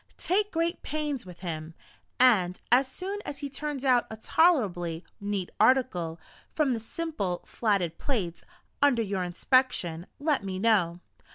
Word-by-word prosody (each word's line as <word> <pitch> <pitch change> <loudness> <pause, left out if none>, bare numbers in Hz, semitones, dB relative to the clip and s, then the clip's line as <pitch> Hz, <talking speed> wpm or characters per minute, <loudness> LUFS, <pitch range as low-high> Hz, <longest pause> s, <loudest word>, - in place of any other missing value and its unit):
Take 410 +3 +1
great 335 +2 -1
pains 295 -7 -3
with 180 0 -12
him, 160 -2 -5 0.4
and 195 -8 +4
as 255 +2 +5
soon 380 +9 -5
as 285 - -5
he 285 -1 -5
turns 285 -1 -4
out 250 -2 +4
a 220 - -7
tolerably 195 - +2
neat 200 -3 -3
article, 180 -11 +2 0.4
from 295 -5 +2
the 230 - -2
simple 225 - -3
flatted 195 -7 0
plates, 195 - -2 0.4
under 265 -5 +4
your 195 -2 -2
inspection, 180 -3 +1
let 290 -5 +1
me 190 -1 -4
know. 185 -5 +2
230 Hz, 145 wpm, -28 LUFS, 180-285 Hz, 0.4 s, as